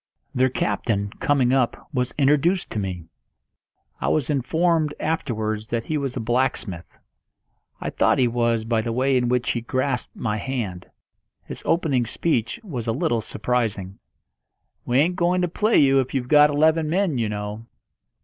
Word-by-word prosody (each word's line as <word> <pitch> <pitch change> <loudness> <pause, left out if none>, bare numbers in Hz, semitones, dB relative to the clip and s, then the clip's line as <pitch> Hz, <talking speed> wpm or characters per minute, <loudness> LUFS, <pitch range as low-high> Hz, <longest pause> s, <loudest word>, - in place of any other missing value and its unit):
Their 130 +1 +3
captain, 100 -5 -1
coming 130 -3 +2
up, 130 -3 0
was 125 -1 -1
introduced 150 +6 +2
to 110 - -2
me. 90 -4 -4 1.0
I - - -2
was 150 -2 +1
informed 155 +3 +1
afterwards 110 -9 -2
that 115 -1 -2
he 155 - -3
was 140 -4 -2
a - - -1
blacksmith. 115 -6 -2 0.8
I - - -4
thought - - +2
he 125 - +3
was 115 -1 0
by 115 -1 +1
the 115 +1 -3
way 130 +3 +1
in 125 -1 +2
which 125 0 +1
he 120 - -2
grasped 130 +1 -2
my 105 -3 -2
hand. 105 -7 -4 0.5
His - - -8
opening 145 -8 +1
speech 120 - -1
was 125 - -5
a - - +2
little 115 0 0
surprising. 105 -4 -2 0.9
"We 120 - +2
ain't 170 +6 +2
going 180 +1 +2
to - - +2
play 215 +6 +2
you 135 -1 +5
if 130 +1 -2
you've 125 -2 -1
got 150 +2 +6
eleven 155 +2 +2
men, 175 -6 +1
you 110 -2 0
know." 105 +2 -5
125 Hz, 165 wpm, -23 LUFS, 115-150 Hz, 1.0 s, got